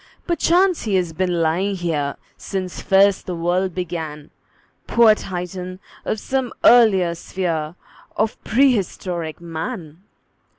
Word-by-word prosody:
Perchance 350 +1 +2
he 205 -3 0
has 175 -3 0
been 175 0 0
lying 185 +5 0
here 155 -6 -2 0.2
Since 185 -2 -5
first 195 0 +3
the 180 - -3
world 175 +2 0
began, 160 -5 -5 0.6
Poor 230 -2 +6
Titan 185 -1 -6 0.3
of 215 - -1
some 260 +2 -2
earlier 200 -8 +6
sphere 170 -2 -3 0.4
Of 220 +1 -1
prehistoric 195 - 0
Man! 165 0 -6
185 Hz, 115 wpm, -21 LUFS, 170-210 Hz, 0.6 s, Poor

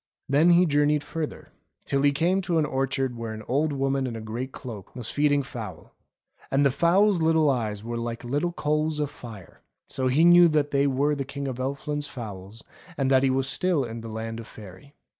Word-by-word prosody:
Then 150 +5 +4
he 175 +1 +5
journeyed 145 -1 +2
further, 155 0 -5 0.4
till 140 - 0
he 145 0 +4
came 170 +7 +1
to 175 -2 -1
an 155 - +2
orchard 135 -2 -1
where 115 -1 -5
an 110 0 -8
old 145 +4 +1
woman 135 -1 0
in 120 - -5
a - - -5
grey 110 +4 -4
cloak 115 -7 -10
was 125 -4 -3
feeding 145 -1 +2
fowls. 110 - -8 0.6
And 140 +1 +2
the 140 - +4
fowls' 180 +6 +3
little 160 -2 +3
eyes 110 -5 -2
were 120 +1 -4
like 115 0 -5
little 145 +8 -1
coals 155 -1 -1
of 145 -1 -1
fire, 110 -9 -12 0.3
so 130 -1 -1
he 145 +6 +4
knew 175 0 +8
that 150 -2 +1
they 140 0 +2
were 140 +2 +1
the 140 - -2
King 140 +1 -6
of 130 -2 -5
Elfland's 145 +2 -3
fowls, 105 -4 -8 0.3
and 135 -1 +1
that 130 -1 +5
he 135 - +2
was 130 0 0
still 180 -2 +1
in 115 -1 -6
the 115 - -8
Land 115 +1 -5
of 115 - -9
Faery. 105 +8 -13
135 Hz, 210 wpm, -26 LUFS, 120-150 Hz, 0.6 s, knew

